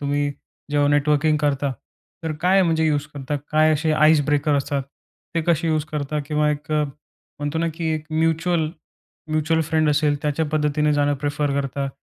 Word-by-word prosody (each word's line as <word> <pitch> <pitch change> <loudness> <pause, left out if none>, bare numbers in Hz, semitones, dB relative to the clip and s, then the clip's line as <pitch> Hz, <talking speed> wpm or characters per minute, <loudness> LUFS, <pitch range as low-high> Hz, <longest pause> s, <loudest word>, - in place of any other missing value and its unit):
तुम्ही 145 0 0 0.4
जेव्हा 145 -1 +2
नेटवर्किंग 150 +1 +3
करता. 140 -2 0 0.5
तर 160 - -2
काय 190 +2 +4
म्हणजे 160 -2 +2
यूज 145 -1 0
करता? 145 +1 -3
काय 155 +1 +4
असे 155 +1 0 0.2
आईस 155 -1 +5
ब्रेकर 145 0 +2
असतात? 140 0 -1 0.5
ते 165 - +2
कसे 170 -1 +2
यूज 155 -1 +1
करता? 150 0 -2
किंवा 150 0 +1
एक 150 +1 -4
म्हणतो 150 +1 -4
ना, 165 +1 +1
की 165 -1 -3
एक 155 -1 -5
म्युच्युअल, 165 +1 +1 0.6
म्युच्युअल 155 +1 +1
फ्रेंड 155 0 +1
असेल. 150 0 +2
त्याच्या 150 +2 0
पद्धतीने 150 0 +1
जाणं 145 0 +2
प्रिफर 145 0 0
करता. 140 0 -3
150 Hz, 165 wpm, -22 LUFS, 145-160 Hz, 0.6 s, आईस